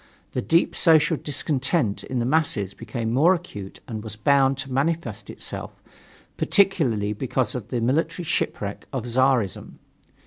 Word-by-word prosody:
The 125 - -2
deep 165 +6 +2
social 160 0 +4
discontent 140 - -1
in 130 - -4
the 120 - 0
masses 125 - +1
became 115 -2 -4
more 165 +9 +5
acute 105 - -9
and 110 -2 -5
was 110 -1 -6
bound 135 +4 +3
to 135 0 -5
manifest 165 +5 -1
itself, - - -5 0.6
particularly 140 - +2
because 125 +1 -1
of 120 -5 -5
the 120 -3 -2
military 150 +8 0
shipwreck 105 -10 -2
of 130 -4 -3
Czarism. 125 -5 +1
130 Hz, 140 wpm, -24 LUFS, 115-155 Hz, 0.6 s, more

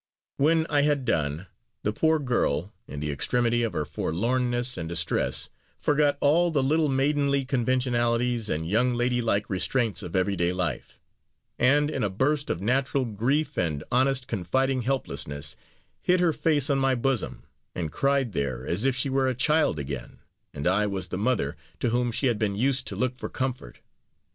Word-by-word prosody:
When 160 +3 +3
I 145 -1 +2
had 145 -2 +1
done, 80 -4 -1 0.4
the 105 - 0
poor 160 +7 +2
girl, 110 - 0
in 75 - -7
the 75 0 -2
extremity 120 - +1
of 115 -2 -1
her 75 - -1
forlornness 120 - -1
and 80 - -5
distress, 85 -1 0 0.3
forgot 145 -1 +2
all 165 +5 +3
the 145 -5 +1
little 155 +2 +2
maidenly 140 0 +1
conventionalities 120 -2 +1
and 80 +1 -2
young 120 +6 +2
lady 120 0 +1
like 105 -3 0
restraints 110 +3 0
of - - -7
everyday 90 -2 +1
life 90 -2 -3 0.6
and, 145 +4 +3
in 130 - -2
a 105 - +1
burst 140 +9 0
of 85 - -2
natural 130 +4 +1
grief 125 +8 -1
and 75 -4 -1
honest 130 +1 +2
confiding 130 +7 0
helplessness, 110 - -2 0.5
hid 180 0 +2
her 175 -2 +3
face 150 -3 +1
on 135 - +2
my 135 -1 +2
bosom, 130 0 -1 0.3
and 80 -4 -3
cried 135 - +1
there 65 -6 -3
as 95 +9 +1
if 135 -2 +2
she 135 +1 0
were 135 0 +1
a 130 - 0
child 150 - +2
again, 70 -4 -6 0.3
and 75 0 -6
I 100 +4 +3
was 95 -3 -3
the 90 - -3
mother 100 - 0 0.2
to 120 - 0
whom 120 0 +1
she 120 +4 -1
had 120 -5 +1
been 100 -2 0
used 130 +3 +1
to - - -3
look 130 0 -1
for - - -5
comfort. 130 - -4
125 Hz, 175 wpm, -26 LUFS, 95-135 Hz, 0.6 s, When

